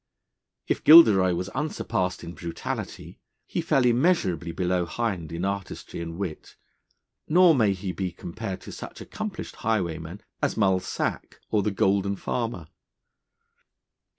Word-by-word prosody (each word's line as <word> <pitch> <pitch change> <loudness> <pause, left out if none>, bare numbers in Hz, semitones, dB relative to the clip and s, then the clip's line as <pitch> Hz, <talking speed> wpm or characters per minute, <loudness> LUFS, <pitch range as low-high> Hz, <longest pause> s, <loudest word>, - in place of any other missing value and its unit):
If - - -1
Gilderoy 105 - +8
was 90 +2 -3
unsurpassed 95 - -2
in 85 0 -7
brutality, 85 -1 -6 0.3
he - - -2
fell 150 -6 +2
immeasurably 120 - +2
below 90 0 0
Hind 90 -5 -3
in 85 +3 -3
artistry 100 -3 -4
and 85 0 -6
wit, 90 -5 -6 0.7
nor 175 +1 +6
may 110 -8 +3
he 95 0 -4
be 90 0 -3
compared 90 +2 -6
to - - -9
such - - -9
accomplished - - -6
highwaymen 90 -4 -2 0.2
as - - 0
Mull 95 -1 +3
Sack - - -4
or 105 - +3
the 105 - 0
Golden 100 0 +1
Farmer. 115 -5 -3
95 Hz, 130 wpm, -26 LUFS, 90-115 Hz, 0.7 s, Gilderoy